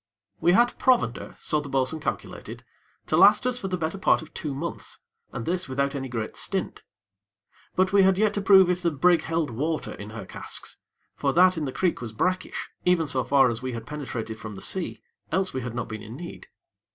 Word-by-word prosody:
We 175 - +4
had 240 +4 +3
provender, 240 - +1
so 150 - 0
the 145 - -8
bo'sun 135 +3 0
calculated, - - -5 0.4
to - - 0
last - - +6
us 250 0 0
for 195 - -3
the 185 -1 -1
better 165 +3 -3
part 175 - +3
of 160 - -15
two 145 -3 -4
months, 165 +5 -5 0.3
and 115 - -5
this 180 -2 -1
without 140 +1 0
any 135 -2 -4
great 115 -3 -4
stint; - - -3 0.9
but 185 +1 +2
we 200 - +7
had 190 -1 +4
yet 215 0 +3
to 205 - -1
prove 190 -1 +7
if 180 0 0
the 175 - +2
brig 165 +3 +3
held 165 -4 -1
water 155 +7 -2
in 100 - -8
her 115 +1 -7
casks, - - -6 0.4
for 140 -1 0
that 185 +1 +6
in 160 -2 -2
the 135 - -3
creek 175 +1 0
was 115 -2 -6
brackish, 185 +11 -2
even 180 -2 +3
so 130 -3 0
far 135 -2 +5
as 115 -1 -2
we 130 -1 -3
had 115 -1 -6
penetrated 125 -6 -5
from 105 -1 -7
the - - -9
sea; 185 -3 -3 0.3
else 185 +2 0
we 130 - -2
had 120 -1 -5
not 120 - -3
been 110 -1 -6
in 110 +2 -9
need. 175 - -9
155 Hz, 215 wpm, -26 LUFS, 130-185 Hz, 0.9 s, we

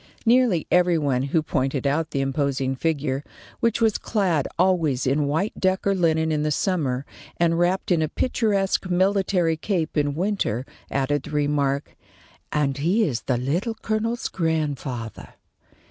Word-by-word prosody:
Nearly 235 -8 +3
every 180 -1 +4
one 140 -5 +1
who 145 +4 0
pointed 135 -1 -1
out 155 +3 +1
the 140 -2 -1
imposing 135 -1 -1
figure, 145 -2 -1 0.4
which 230 -1 +1
was 220 -2 +2
clad 180 - 0
always 165 -8 +2
in 140 +2 +1
white 160 +9 0
duck 190 0 +1
or 200 - +3
linen 160 -3 +1
in 150 -1 0
the 155 - 0
summer, 145 -6 0 0.3
and 170 0 +2
wrapped 180 +2 +1
in 170 -3 +3
a 155 - 0
picturesque 200 -4 0
military 185 -2 +2
cape 165 -2 -2
in 145 -2 +1
winter, 175 - -1 0.2
added 140 +1 0
the - - -10
remark: 145 -1 0 0.6
"And 140 -2 0
he 185 +10 +2
is 125 - -1
the 125 +2 0
Little 170 - -1
Colonel's 220 +2 -2
grandfather." 145 - -3
160 Hz, 150 wpm, -24 LUFS, 140-185 Hz, 0.6 s, every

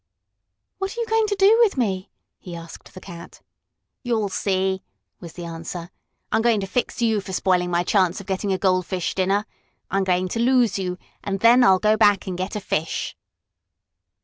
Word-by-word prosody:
"What 390 +4 -4
are - - -3
you 470 - 0
going 445 -1 +1
to 410 - -1
do 400 +4 +5
with 425 -10 +3
me?" 195 -6 -1 0.3
he 175 -2 -9
asked 165 -1 -11
the - - -8
cat. 170 -2 -11 0.6
"You'll 225 -5 -1
see!" 190 0 -1 0.4
was 170 -3 -10
the 175 - -7
answer. 165 +1 -7 0.4
"I'm - - +2
going 230 -2 +3
to - - -2
fix 240 +3 -2
you 220 -3 +2
for 190 0 -8
spoiling 180 -1 +1
my 175 0 +1
chance 185 -2 +1
of 200 - -10
getting 195 +1 -2
a 190 - +1
goldfish 185 -1 0
dinner! 195 +3 +1 0.5
I'm 195 0 +1
going 185 0 +1
to 230 - -3
lose 240 -4 +3
you, 180 -1 -3 0.3
and 195 -1 -2
then 240 +2 +6
I'll 190 -3 +6
go 215 +3 +2
back 205 -3 +4
and 185 - -4
get 185 +4 -4
a - - -1
fish." 165 -5 -3
195 Hz, 190 wpm, -23 LUFS, 185-230 Hz, 0.6 s, then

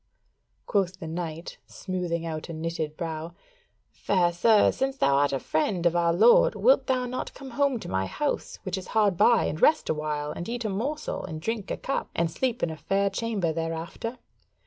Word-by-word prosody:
Quoth 190 -3 0
the 170 - -7
knight, 165 0 -5
smoothing 175 -3 -3
out 160 0 -5
a - - -5
knitted 160 -1 -4
brow: 165 0 -5 0.6
"Fair 175 -3 +1
sir, 215 +4 +5
since 270 0 -2
thou 140 - +3
art 145 0 +3
a 135 - 0
friend 170 +5 -1
of 170 0 +3
our 170 -1 +3
lord, - - +5
wilt - - +4
thou 255 -2 +1
not 250 +1 -4
come 270 -1 -9
home 275 0 +1
to - - -8
my 95 0 -1
house, 295 - -2
which 190 -1 -3
is 185 - -10
hard 205 -4 +4
by, 235 +7 +4
and 155 - -3
rest 310 - +4
awhile, 150 -1 -2
and 170 - -6
eat 240 0 -3
a - - 0
morsel, 265 +10 -3
and 155 -1 -6
drink 215 +3 -3
a - - -2
cup, 275 - -3
and 170 -1 +1
sleep 250 +5 -1
in 170 - +1
a 160 - -7
fair 195 +4 0
chamber 200 -6 -1
thereafter?" 165 +9 -4
180 Hz, 195 wpm, -27 LUFS, 160-230 Hz, 0.6 s, sir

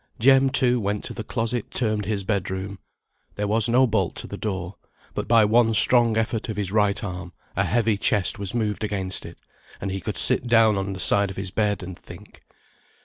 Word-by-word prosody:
Jem, 135 +2 +4
too, 125 -2 +1
went 105 -1 -3
to - - -7
the 110 - -7
closet 115 0 -3
termed 110 -4 -2
his 100 -1 -3
bed 100 -2 -2
room. 95 +1 -6 0.6
There 105 - -3
was 110 +2 +2
no 125 +3 +4
bolt 105 -6 -1
to - - -6
the - - -8
door; 95 -3 -5 0.4
but - - -5
by 115 -2 +4
one 115 +1 +2
strong 115 0 +4
effort 110 +1 -2
of 110 - -5
his 100 -3 -3
right 105 0 0
arm, 90 -2 -7 0.2
a 95 - 0
heavy 110 +2 0
chest 105 +1 0
was 100 +3 -2
moved 110 -2 -2
against 95 -3 -3
it, - - -13 0.4
and 95 - -5
he 95 0 -5
could - - -4
sit 125 - +7
down 115 -2 +4
on 95 0 -3
the 95 - -8
side 100 +2 +3
of 95 - -10
his 95 -1 -5
bed, 105 -1 -1
and 90 0 -8
think. - - -15
105 Hz, 210 wpm, -23 LUFS, 95-115 Hz, 0.6 s, sit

